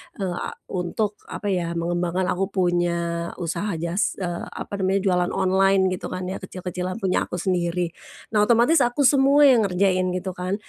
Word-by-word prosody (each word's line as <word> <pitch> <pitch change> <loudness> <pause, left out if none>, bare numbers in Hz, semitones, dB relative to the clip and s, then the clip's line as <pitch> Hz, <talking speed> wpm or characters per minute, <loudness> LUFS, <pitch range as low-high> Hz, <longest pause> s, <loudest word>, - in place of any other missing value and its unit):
eee, 190 -3 -3
a 175 - -5 0.2
untuk 200 +3 -2
apa 205 -2 -3
ya, 170 -2 -1
mengembangkan 175 +2 -1
aku 190 +2 -1
punya 175 -1 +1 0.4
usaha 175 +3 -3
jas 170 +5 -1
eee, 175 -1 -4
apa - - -7
namanya 190 +1 +1
jualan 180 -2 +1
online 195 +1 +3
gitu 185 - -4
kan 185 0 -5
ya, - - -5
kecil-kecilan 180 0 -5
punya 185 - +1
aku - - -5
sendiri. 175 -1 -1 0.4
Nah, 210 -1 +3
otomatis 240 +7 +4
aku 245 +2 +2
semua 280 +2 +5
yang 245 -7 +6
ngerjain 185 0 +1
gitu 185 +1 -3
kan. 180 +1 -3
185 Hz, 170 wpm, -23 LUFS, 175-200 Hz, 0.4 s, yang